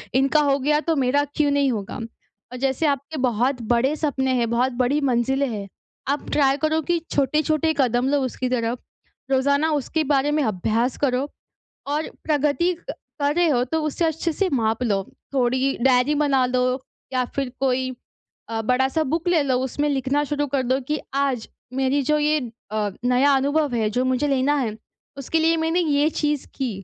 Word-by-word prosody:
इनका 275 +3 +4
हो 280 -2 +2
गया, 295 +3 +2
तो 325 +1 0
मेरा 275 +1 +2
क्यों 290 -1 +2
नहीं 280 -2 +2
होगा? 205 -4 -4 0.6
और 250 - -6
जैसे 270 +4 0
आपके 280 +2 -2
बहुत 245 +2 0
बड़े 265 +5 +2
सपने 270 -4 -1
हैं, 235 -2 +1
बहुत 245 +3 +1
बड़ी 275 +4 +2
मंजिलें 265 +4 +1
है। 205 -3 -5 0.4
आप 285 - -2
ट्राई 275 -2 +3
करो 310 +2 +1
कि 340 +2 0
छोटे-छोटे 305 +3 +1
कदम 245 -1 +2
लो 290 - +2
उसकी 255 0 -2
तरफ। 235 -1 -1 0.5
रोज़ाना 280 +4 +2
उसके 305 +3 -1
बारे 280 +1 +2
में 300 0 +1
अभ्यास 220 +4 0
करो 260 +1 0 0.7
और 310 +1 -2 0.2
प्रगति 300 +4 +1
क - - -2 0.3
कर 285 +1 +2
रहे 350 -1 +3
हो, 245 -4 +2
तो 320 +6 -1
उसे 305 +3 0
अच्छे 325 +1 -1
से 385 +5 0
माप 225 -1 0
लो। 200 -5 0 0.3
थोड़ी 260 +1 +1
डायरी 260 +2 +3
बना 280 -3 +2
लो 255 +1 0 0.3
या 255 -1 +2
फिर 275 -2 -2
कोई 260 -1 +1 0.6
अ, 225 0 -2
बड़ा 250 +4 +2
सा 315 +3 0
बुक 325 +5 -2
ले 340 -3 +4
लो, 265 -2 +1
उसमें 275 +3 -1
लिखना 280 +1 0
शुरू 290 0 -1
कर 270 -1 0
दो 260 +2 +1
कि 300 0 -1
आज 275 -4 0 0.3
मेरी 270 +2 +1
जो 300 - +4
ये 300 +1 +2 0.3
अ, 215 -1 0 0.2
नया 250 +3 +4
अनुभव 285 0 +1
है, 220 -2 +1
जो 250 +4 0
मुझे 260 +3 +1
लेना 275 +1 +2
है, 225 -6 -2 0.4
उसके 280 +4 -1
लिए 325 +1 +3
मैंने 325 +2 +1
ये 295 -2 +2
चीज़ 295 -2 -1
की 265 -2 -1
275 Hz, 185 wpm, -23 LUFS, 250-295 Hz, 0.7 s, इनका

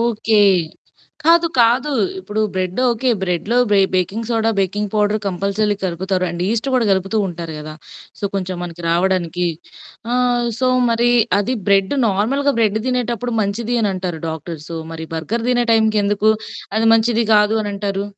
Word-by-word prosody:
Okay. 225 -2 +2 0.8
కాదు. 335 +1 +5
కాదు. 245 +5 +3 0.3
ఇప్పుడు 215 - -3
బ్రెడ్ 185 +3 -2
ఓకే. 245 +2 0
బ్రెడ్‌‌లో 190 +6 -1 0.2
బే 200 - +5 0.2
baking 200 +5 -1
soda, 225 -1 +1
baking 200 +2 -1
powder 210 0 +1
compulsorily 200 +2 -1
కలుపుతారు 185 +1 -1
అండ్ 175 +1 -4
ఈస్ట్ 230 +4 -1
గూడా 240 -4 +2
కలుపుతూ 195 +3 0
ఉంటారు 165 -2 -6
గదా! 155 0 -8 0.4
సో, - - -6
కొంచెం 185 -2 -3
మనకి 175 0 -7
రావడానికి. 175 0 0 0.7
ఆహ్, 245 -1 +1
సో 255 -1 +2 0.2
మరి 235 +1 +2 0.3
అది 245 +6 0
బ్రెడ్ 195 +6 +3
నార్మల్‌గా 270 +9 +1
బ్రెడ్ 220 -1 +2
తినేటప్పుడు 245 -1 -1
మంచిది 220 +4 -1
అనంటారు 185 -5 -2
డాక్టర్సు. 160 0 -6 0.2
మరి 160 0 -6
బర్గర్ 225 +9 -3
తినే 245 -1 +2
టైంకి 220 -1 +3
ఎందుకు 205 +1 +2 0.5
అది 225 +1 +2
మంచిది 230 0 +2
కాదు 210 +1 +3
అనంటారు? 200 -1 -3
210 Hz, 145 wpm, -19 LUFS, 185-230 Hz, 0.8 s, కాదు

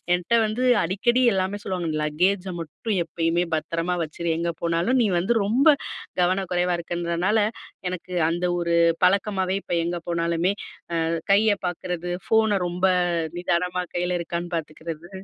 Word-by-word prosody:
என்ட்ட 180 +5 -3
வந்து 215 +4 -2 0.2
அடிக்கடி 240 +9 +2
எல்லாமே 190 +2 -1
சொல்லுவாங்க. 180 -4 -2
லக்கேஜை 180 +5 0
மட்டும் 190 +7 -3
எப்பயுமே 165 +1 0
பத்திரமா 165 +3 -2
வச்சுடு. 165 +2 -4
எங்க 170 0 0
போனாலும் 170 +10 +2
நீ 215 - +2
வந்து 195 +7 +1
ரொம்ப 245 +9 +3 0.5
கவனக்குறைவா 180 -1 +1
இருக்குன்றனால, 170 +4 -1 0.5
எனக்கு 180 0 -6 0.2
அந்த 175 +1 -1
ஒரு 170 -1 +1 0.3
பழக்கமாவே 195 -1 +1
இப்போ - - -12
எங்க 175 +1 -2
போனாலுமே, 170 +1 +1 0.5
அ - - 0 0.3
கைய 215 +2 +5 0.2
பார்க்கறது. 175 0 -4 0.2
ஃபோன 220 -2 +3
ரொம்ப 175 +2 0 0.5
நிதானமா 180 +1 0
கையில 180 0 0
இருக்கான்னு 170 +1 -4
பார்த்துக்கறது. 160 +1 -6
180 Hz, 130 wpm, -24 LUFS, 170-190 Hz, 0.5 s, கைய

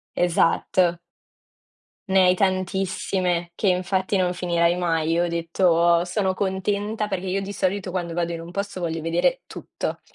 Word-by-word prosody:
Esatto. 175 0 +2 1.1
Ne 190 0 +5
hai 180 0 +5
tantissime 185 -2 -1
che 205 - -2
infatti 185 +2 0
non 180 -1 +1
finirai 175 -1 +1
mai. 165 -2 0
Io 170 +1 +2
ho - - -1
detto: 170 0 +2
"Sono 190 +1 0
contenta", 200 +3 -1
perché 190 -2 -4
io 190 +1 -1
di 195 +1 -5
solito 190 -1 -1
quando 175 -2 -3
vado 170 0 -1
in 165 - -5
un 165 +1 -9
posto 200 0 -4
voglio 165 -2 -3
vedere 175 - +1
tutto - - -6
180 Hz, 155 wpm, -23 LUFS, 170-190 Hz, 1.1 s, Ne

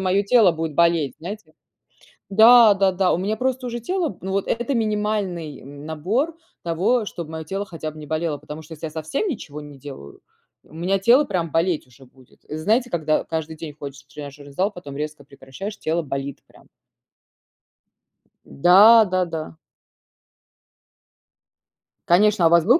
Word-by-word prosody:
моё 190 +1 +2
тело 205 -4 +5
будет 160 -2 -4
болеть, 170 -4 +2
знаете. 205 +6 -8 0.7
Да-да-да, 200 -4 +6
у - - -1
меня 210 +4 -1
просто 255 0 -1
уже 240 0 -4
тело 340 - -2
ну 190 +1 -4
вот 195 0 -1
это 240 +1 -1
это 275 - -1
минимальный 210 - -2
набор 160 - -3 0.3
того, 200 +8 +1
чтоб 170 -4 -6
моё 160 0 -6
тело 195 +5 -3
хотя 165 -5 -6
бы 155 - -13
не 150 - -9
болело. 155 -1 -2
Потому 150 +1 -9
что, 160 +1 -10
если 160 +1 -6
совсем 160 - -3
ничего 150 - -6
не 145 -2 -12
делаю, 130 - -11 0.5
у 155 - -17
меня 185 +4 0
тело 240 +9 +5
прям 170 -6 -2
болеть 165 -3 0
уже 130 +1 -18
будет. 130 0 -23
Это 155 - -6
знаете, 225 +8 +1
когда 155 -2 0
каждый 160 -1 -4
день 155 -2 -7
ходишь 140 -1 -8
в - - -25
тренажерный 145 -1 -10
зал, 195 +7 0
потом 145 -7 -9
резко 150 -1 -5
прекращаешь, 140 +10 -9
тело 165 +2 -1
болит 135 -1 -5
прям. - - -21 1.8
Да-да-да. 180 -3 +4 2.5
Конечно, 195 0 +4
а - - +8
у - - -4
вас 170 -1 +5
был 255 +10 +5
170 Hz, 160 wpm, -22 LUFS, 150-210 Hz, 2.5 s, а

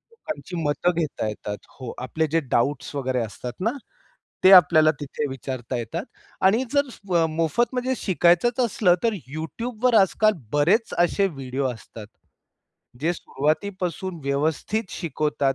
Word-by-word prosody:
लोकांची 310 - -7
मतं 150 +4 +1
घेता 150 -8 -2
येतात. 105 -1 -5
हो. 130 -3 -8
आपले 160 +5 -1
जे 165 - +3
डॉब्ट्स 140 +4 0
वगैरे 130 -2 -1
असतात 115 +2 -5
ना, 215 +5 +1 0.7
ते 190 - +9
आपल्याला 160 -4 +7
तिथे 145 +1 -3
विचारता 130 -2 -5
येतात. 120 - -4 0.4
आणि 210 +7 +3
जर 285 -1 +2
स - - -13 0.2
आ, 165 -1 +4
मोफत 165 +9 +2
म्हणजे 255 +1 -1
शिकायचंच 185 +7 +2
असलं, 195 -5 +3
तर 230 -2 +2 0.2
YouTubeवर 230 +9 -1
आजकाल 215 +3 +3 0.2
बरेच 175 +11 +2
असे 175 +3 +3
व्हिडिओ 135 -3 -3
असतात. 110 -2 -11 0.9
जे 165 +4 +1
सुरुवातीपासून 175 +3 -2
व्यवस्थित 160 +9 -1
शिकवतात, 150 -4 -1
165 Hz, 135 wpm, -24 LUFS, 140-200 Hz, 0.9 s, ते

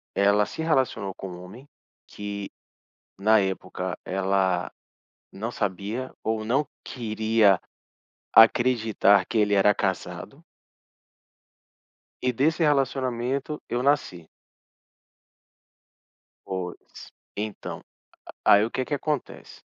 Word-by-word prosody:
ela 100 +1 +4
se - - -7
relacionou 130 - 0
com 95 - -7
um 90 0 -9
homem 115 +9 -12 0.4
que, 100 -1 -6 0.7
na 110 +2 +4
época, 95 -1 -3
ela 95 -1 0 0.6
não 110 +4 -4
sabia 105 +4 -3
ou 110 -1 -1
não 135 +6 +1 0.2
queria 110 -4 +2 0.7
acreditar 110 -4 +5
que 115 - -1
ele 105 -1 +3
era 100 +1 +4
casado 95 -3 -4 1.8
e 125 0 +1
desse 155 +7 +1
relacionamento, 135 0 0
eu 120 +1 -1
nasci. 130 - 0 2.2
Pois. 95 -2 -4 0.6
Então, 105 0 -5 0.6
a - - +7
aí 100 - +5
o 115 - -3
que 130 - -2
que 145 - -2
acontece? 145 -1 -4
110 Hz, 100 wpm, -25 LUFS, 95-130 Hz, 2.2 s, a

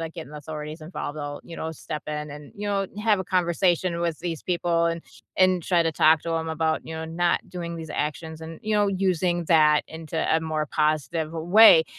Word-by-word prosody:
like, 165 +1 -5
getting 160 -5 -8
the 150 - -7
authorities 150 +1 -7
involved, 155 -2 -6
I'll, 145 -1 -5
you 170 - -9
know, 160 - -4
step 155 -1 -6
in 150 -1 -4
and, 145 0 -10
you 205 +1 -4
know, 200 -1 0 0.2
have 215 -3 +4
a - - -4
conversation 175 -1 +1
with 170 -2 -1
these 170 -2 -4
people 170 -1 +1
and 165 0 -2 0.3
and 185 -2 +4
try 175 -1 +2
to 165 - +1
talk 155 +1 +5
to 165 -1 -2
'em 160 0 -2
about, 160 0 0
you 160 - -7
know, 160 0 -4
not 170 +2 0
doing 170 -2 -5
these 160 -2 -7
actions 160 +2 -3
and, 160 0 -8
you 215 0 -1
know, 205 -1 +3
using 180 -3 0
that 155 -2 +4
into 160 0 -6 0.2
a 160 - +3
more 155 -1 -2
positive 155 +1 0
way, 170 +1 +7
165 Hz, 215 wpm, -25 LUFS, 155-175 Hz, 0.3 s, way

